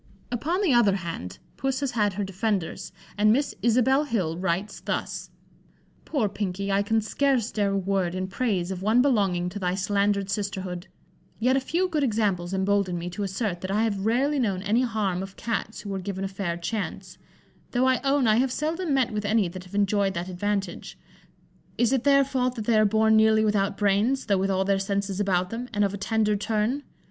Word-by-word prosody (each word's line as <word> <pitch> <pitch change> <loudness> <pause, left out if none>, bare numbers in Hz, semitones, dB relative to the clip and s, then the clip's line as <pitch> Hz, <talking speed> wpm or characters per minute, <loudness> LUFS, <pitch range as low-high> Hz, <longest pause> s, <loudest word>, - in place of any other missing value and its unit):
Upon 325 - -1
the 330 -9 +3
other 220 -5 +4
hand, 165 - -5 0.2
Puss 270 0 -1
has 275 -2 -1
had 210 -4 +1
her 205 +2 -2
defenders, 190 -2 -2 0.3
and 215 +1 +5
Miss 280 +5 +1
Isabel 255 +6 +3
Hill 190 - -1
writes 185 +3 -2
thus: - - -4 0.8
"Poor 275 -9 0
Pinkey, 200 0 -3
I 195 +1 +3
can 220 +2 +1
scarce 250 +1 +1
dare 205 -2 0
a - - +1
word 190 -2 0
in 185 0 -2
praise 195 -3 -1
of 185 -1 -5
one 220 +5 +4
belonging 195 -10 +2
to 205 - -6
thy 180 -1 0
slandered 200 0 +1
sisterhood; 190 -3 -3 0.5
yet 250 +3 +2
a - - +3
few 340 +8 0
good 315 -4 -1
examples 205 -7 0
embolden 190 -1 +1
me 175 +1 -5
to 180 - -6
assert 195 -2 -2
that 185 - -5
I 210 +3 +1
have 200 -4 -1
rarely 275 +5 +2
known 195 -6 0
any 220 +4 +2
harm 215 -7 -1
of 195 0 -8
Cats 230 -1 -3
who 200 - -6
were 195 - -2
given 190 0 -4
a - - 0
fair 190 -3 -3
chance, 200 +5 -5 0.5
though 250 +1 +1
I 260 -1 +2
own 275 -1 +2
I 215 -1 +4
have 260 +1 +2
seldom 315 +2 -1
met 255 -3 +2
with 210 -1 -2
any 205 -2 +2
that 185 +1 -9
have 185 +2 -11
enjoyed 200 -1 +1
that 175 +2 -3
advantage. 195 0 -3 0.8
Is 240 +1 +2
it 265 -1 0
their 275 -1 +6
fault 255 -2 -1
that 220 -3 -5
they 225 -1 +3
are 215 - +5
born 220 +1 +3
nearly 220 0 +5
without 200 -2 +1
brains, 210 +6 +2
though 200 -3 +2
with 195 +1 0
all 190 0 +1
their 195 0 +2
senses 200 0 -2
about 185 -3 +1
them, 240 +2 -5
and 205 -3 +1
of 195 - -2
a - - -3
tender 210 +1 +1
turn? 215 +6 0
205 Hz, 205 wpm, -26 LUFS, 190-235 Hz, 0.8 s, their